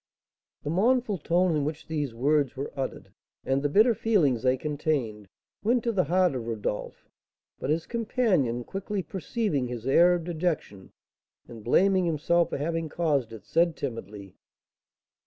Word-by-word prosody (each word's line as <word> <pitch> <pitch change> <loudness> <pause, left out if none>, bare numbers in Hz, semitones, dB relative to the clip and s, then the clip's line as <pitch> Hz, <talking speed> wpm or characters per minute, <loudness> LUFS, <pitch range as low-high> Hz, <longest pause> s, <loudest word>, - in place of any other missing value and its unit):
The 145 - -2
mournful 220 +2 +2
tone 175 +2 +2
in 150 - +1
which 155 +1 -4
these 150 -5 -2
words 140 +3 +1
were 135 +2 -5
uttered, 135 -2 -5 0.3
and 135 +1 +1
the 145 - 0
bitter 220 - +5
feelings 170 - +2
they 130 0 +2
contained, 140 -8 -2 0.4
went 235 +2 +2
to 235 - +1
the 190 -6 +1
heart 180 +1 +2
of 120 -3 -4
Rodolph; 105 -2 -4 0.5
but 130 - -4
his 160 +2 0
companion, 205 - 0
quickly 195 - -4
perceiving 190 - -2
his 120 -1 -6
air 175 +6 +5
of 175 - -3
dejection, 160 - -3 0.6
and 115 -3 -11
blaming 185 - +3
herself 170 +2 +2
for - - -3
having 165 +2 -2
caused 145 -8 0
it, 110 -2 -10
said, 170 0 +2
timidly: 105 -7 -6
"M. - - -27
155 Hz, 155 wpm, -27 LUFS, 130-185 Hz, 0.6 s, bitter